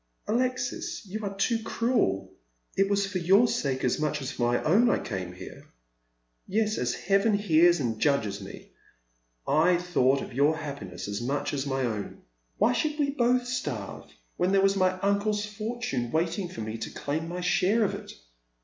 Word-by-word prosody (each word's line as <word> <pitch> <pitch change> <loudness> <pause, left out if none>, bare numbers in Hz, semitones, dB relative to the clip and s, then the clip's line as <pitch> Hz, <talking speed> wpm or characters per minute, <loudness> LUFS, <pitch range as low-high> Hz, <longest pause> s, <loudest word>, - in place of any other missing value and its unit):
" - - -46
Alexis, 245 0 -1
you 210 +3 -6
are 200 -1 -4
too 225 +3 +1
cruel. 95 - 0 0.4
It 195 0 +2
was 200 0 +2
for 195 -1 -3
your 195 +7 +5
sake 135 - -1
as 125 - +1
much 150 0 0
as 135 0 -4
for 120 0 0
my - - 0
own 215 +10 +4
I - - +3
came 95 -4 -5
here. 95 +1 -11 0.8
Yes, 215 +1 0
as 125 0 0
Heaven 200 +3 +2
hears 175 -3 +4
and 115 -5 -2
judges 110 -6 +1
me, 95 - -11 0.8
I 165 +5 +4
thought 140 -7 +2
of - - -9
your 145 +5 +3
happiness 140 - -6
as 100 +2 -3
much 145 +4 -2
as 140 -1 -2
of - - -3
my 135 0 0
own. 105 -4 -5 0.3
Why - - +3
should 305 -1 -1
we 285 -2 +1
both 250 -2 +2
starve, 145 - -4 0.3
when 180 +1 +1
there 195 0 +4
was 195 0 +4
my 185 -1 +3
uncle's 205 +1 +1
fortune 215 - -3
wait 165 - 0
ing 185 -3 -3
for 115 - -7
me 110 +1 -5
to - - -4
claim 155 +3 -3
my 180 +1 -4
share 205 +4 +2
of 200 - 0
it - - -7
175 Hz, 190 wpm, -27 LUFS, 130-210 Hz, 0.8 s, your